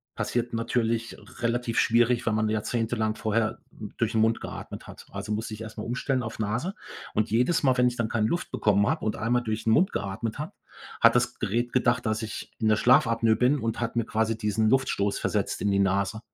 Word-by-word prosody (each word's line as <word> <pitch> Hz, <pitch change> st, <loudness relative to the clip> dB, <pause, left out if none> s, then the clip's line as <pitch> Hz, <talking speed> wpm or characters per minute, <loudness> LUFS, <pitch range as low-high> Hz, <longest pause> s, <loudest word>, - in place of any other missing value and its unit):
passiert 120 Hz, 0 st, -2 dB
natürlich 115 Hz, 0 st, -1 dB, 0.2 s
relativ 120 Hz, 0 st, 0 dB
schwierig, 120 Hz, +1 st, +3 dB
wenn 110 Hz, -1 st, +1 dB
man 110 Hz, 0 st, +1 dB
jahrzehntelang 110 Hz, 0 st, -1 dB
vorher 110 Hz, 0 st, -1 dB
durch 110 Hz, +1 st, -4 dB
'n -, -, +3 dB
Mund 115 Hz, +1 st, +2 dB
geatmet -, -, -7 dB
hat. -, -, -12 dB
Also 105 Hz, -, -5 dB
musste 110 Hz, +1 st, -3 dB
ich 105 Hz, -, -8 dB
erst 110 Hz, 0 st, -8 dB
mal 105 Hz, -, -5 dB
umstellen 125 Hz, +2 st, -1 dB
auf 110 Hz, 0 st, -6 dB
Nase 120 Hz, -, -2 dB, 0.4 s
und 105 Hz, 0 st, 0 dB
jedes 125 Hz, +9 st, +2 dB
Mal, 130 Hz, -2 st, +3 dB
wenn 125 Hz, 0 st, +4 dB
ich 125 Hz, -, -1 dB
dann 115 Hz, -2 st, -1 dB
keine 110 Hz, -2 st, +1 dB
Luft 175 Hz, -, -2 dB
bekommen 105 Hz, -5 st, +2 dB
habe 155 Hz, -5 st, -1 dB
und 110 Hz, -, 0 dB
einmal 120 Hz, +2 st, 0 dB
durch 110 Hz, 0 st, -3 dB
'n 110 Hz, -, +3 dB
Mund 185 Hz, -, +3 dB
geatmet 110 Hz, +6 st, -3 dB
habe, 150 Hz, -, -4 dB, 0.5 s
hat 115 Hz, +1 st, +6 dB
das 120 Hz, 0 st, +1 dB
Gerät 120 Hz, +3 st, -1 dB
gedacht, 125 Hz, -1 st, +1 dB
dass 110 Hz, +1 st, 0 dB
ich 110 Hz, -1 st, -6 dB
in 110 Hz, -, +1 dB
der 110 Hz, -, +5 dB
Schlafapnoe 115 Hz, -1 st, +4 dB
bin 130 Hz, +4 st, +3 dB
und 115 Hz, 0 st, -2 dB
hat 115 Hz, 0 st, -2 dB
mir 115 Hz, -2 st, +1 dB
quasi 110 Hz, 0 st, 0 dB
diesen 110 Hz, 0 st, +1 dB
Luftstoß 105 Hz, -6 st, +1 dB
versetzt -, -, -1 dB
in 105 Hz, -, +1 dB
die 100 Hz, -, +2 dB
Nase 100 Hz, +2 st, +1 dB
115 Hz, 215 wpm, -27 LUFS, 110-120 Hz, 0.5 s, hat